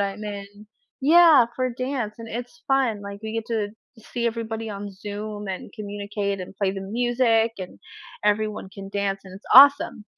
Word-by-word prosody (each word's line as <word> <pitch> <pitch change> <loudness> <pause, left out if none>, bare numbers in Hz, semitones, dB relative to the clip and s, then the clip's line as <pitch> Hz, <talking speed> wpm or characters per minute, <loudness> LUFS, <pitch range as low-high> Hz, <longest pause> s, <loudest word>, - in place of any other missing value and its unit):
I'm 200 +1 -2
in. 200 -1 -5 0.5
Yeah, 310 -3 +7
for 255 -1 -1
dance, 255 -3 -3
and 230 - -8
it's 245 +8 -7
fun, 255 -7 +1
like, 200 0 -8
we 220 - -5
get 225 -1 -3
to 220 -3 -1 0.4
see 235 -1 -1
everybody 225 -1 -3
on 200 0 -6
Zoom 205 +1 -6
and 190 +1 -6
communicate 205 -2 -4
and 185 +2 -9
play 195 -2 +1
the 195 - -5
music, 230 +1 +1
and 185 - -8 0.5
everyone 210 -1 0
can 195 -1 -9
dance, 195 -1 -2
and 185 - -12
it's 195 - -13
awesome. 280 -5 +7
215 Hz, 170 wpm, -24 LUFS, 200-240 Hz, 0.5 s, Yeah